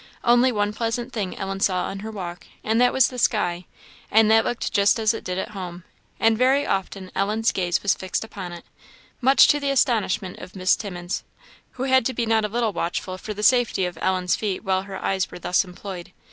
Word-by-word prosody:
Only 245 +2 +4
one 205 -2 0
pleasant 235 +3 -3
thing 200 -5 -3
Ellen 195 0 -4
saw 185 -2 +1
on 195 - -5
her 215 +2 -6
walk, 180 -5 -7 0.2
and 225 +2 +1
that 250 - +5
was 265 -2 +4
the 250 - -6
sky; 180 -6 +1 0.4
and 220 0 +5
that 225 0 +5
looked 240 - -3
just 200 +2 +4
as 220 0 +2
it 225 - -6
did 180 0 -3
at 190 - -3
home; 180 -3 -7 0.4
and 225 0 +4
very 265 +4 +3
often 190 0 -3
Ellen's 215 +3 +1
gaze 175 -2 -1
was 200 - +3
fixed 185 +3 -3
upon 195 -5 -7
it, 170 0 -10 0.6
much 265 +2 +6
to 295 - +4
the 280 -1 -1
astonishment 220 -8 0
of 180 +1 -11
Miss 185 0 +3
Timmins, 180 -3 -5 0.5
who 260 - -5
had 260 -1 +4
to 260 - -4
be 235 - 0
not 225 -1 +2
a - - -3
little 230 -1 0
watchful 185 +2 -3
for 215 +1 -6
the 210 - -5
safety 245 -6 +3
of 175 -2 -6
Ellen's 185 -1 +1
feet 205 -2 -3
while 190 -2 +1
her 195 0 -7
eyes 190 -1 0
were - - -9
thus 180 +2 +1
employed. 180 -1 -9
205 Hz, 215 wpm, -23 LUFS, 185-230 Hz, 0.6 s, much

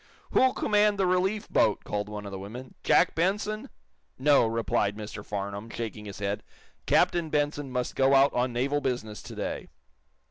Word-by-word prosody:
"Who'll 260 0 +4
command 210 -1 +3
the 195 - +2
relief 190 +4 +1
boat!" 105 - +2
called 105 0 -3
one 105 -1 -6
of 100 - -6
the 95 - -5
women. 120 +7 -8
"Jack 180 - +4
Benson?" 210 +7 -1 0.5
"No," 140 -3 +4
replied 110 -2 0
Mr. 105 -1 -7
Farnum, 100 +2 -5
shaking 110 -2 -5
his 100 - -8
head. 100 +1 -2 0.5
"Captain 170 -2 +3
Benson 145 -1 -1
must 125 -1 -2
go 135 +1 +4
out 135 +1 +5
on 125 +1 +1
naval 135 +5 0
business 120 -5 -3
to - - -10
day." - - -4
125 Hz, 170 wpm, -28 LUFS, 105-170 Hz, 0.5 s, out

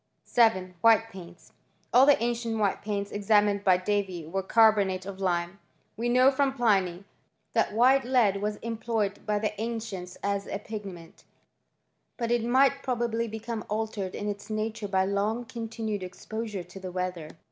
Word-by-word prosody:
7. 190 -6 +2
White 225 0 +4
paints. 175 -3 -12 0.4
All 260 +3 +7
the 290 - +6
ancient 235 -1 -1
white 205 -3 0
paints 200 -1 -3
ex 205 -1 -6
amined 205 -2 +3
by 185 -2 +5
Davy 185 -3 -2
were 190 +5 -2
carbonates 200 -3 +3
of 195 -1 -7
lime.* 175 0 -1 0.4
We 235 +2 -2
know 255 +2 +5
from 270 0 +1
Pliny 195 -7 +1 0.5
that - - +2
white 255 +4 +4
lead 240 -6 +3
was 210 0 -1
employed 225 -3 -2
by 210 0 +1
the 210 0 -1
ancients 220 -6 -5
as 200 0 -1
a - - -3
pigment; 195 -6 -9 0.9
but 235 -1 -2
it 240 -1 +2
might 270 +3 +3
probably 235 -3 -1
become 225 0 -5
altered 210 -3 -3
in 205 - -4
its 205 0 -5
nature 215 0 -3
by 190 -1 +1
long 205 +5 -1
continued 225 -3 -4
exposure 205 +2 -5
to 180 +3 -12
the 185 -1 -7
weather. 180 -4 -4
210 Hz, 160 wpm, -28 LUFS, 195-230 Hz, 0.9 s, All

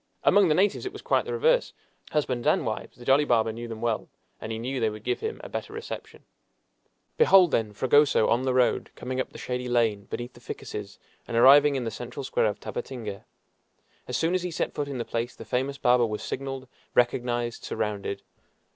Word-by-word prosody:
Among 200 -2 +5
the 155 - +3
natives 195 +2 +2
it - - -6
was - - -10
quite - - +2
the 470 - -4
reverse. 485 +2 +2 0.4
Husbands 130 -6 -1
and - - +3
wives, - - -4
the 120 - -12
jolly 135 +2 +5
barber 115 -5 +2
knew 120 +1 -6
them 115 -1 -7
well, 115 -2 -1 0.3
and 110 - -6
he 110 - -3
knew 130 +4 -3
they 110 -2 +2
would 105 0 -9
give - - -1
him 445 +1 -4
a - - -6
better 420 - -5
reception. 445 +1 -8 0.9
Behold, 195 - +6
then, 110 -2 +1
Fragoso 130 +2 +4
on 120 - +2
the 130 -1 0
road, 125 -1 +2
coming 130 +1 -4
up - - -5
the - - -11
shady 125 0 -4
lane 115 -4 +1
beneath 120 +1 -6
the - - -15
ficuses, 105 -3 -7 0.3
and 115 - -2
arriving 140 +4 +7
in 130 - -1
the 115 - -3
central 120 +5 -7
square 130 -4 +1
of 105 - -3
Tabatinga! 115 -6 -6 0.8
As - - -1
soon 165 +2 +1
as 185 - +1
he 180 - -3
set 165 - -2
foot 145 -1 -2
in 140 -2 -4
the 120 - -3
place 115 +1 -3
the 115 - -10
famous 130 +5 -1
barber 125 -2 +4
was 105 -1 -4
signaled, 135 0 -5 0.3
recognized, 120 -1 +1
surrounded. 100 -2 -3
125 Hz, 210 wpm, -27 LUFS, 115-140 Hz, 0.9 s, arriving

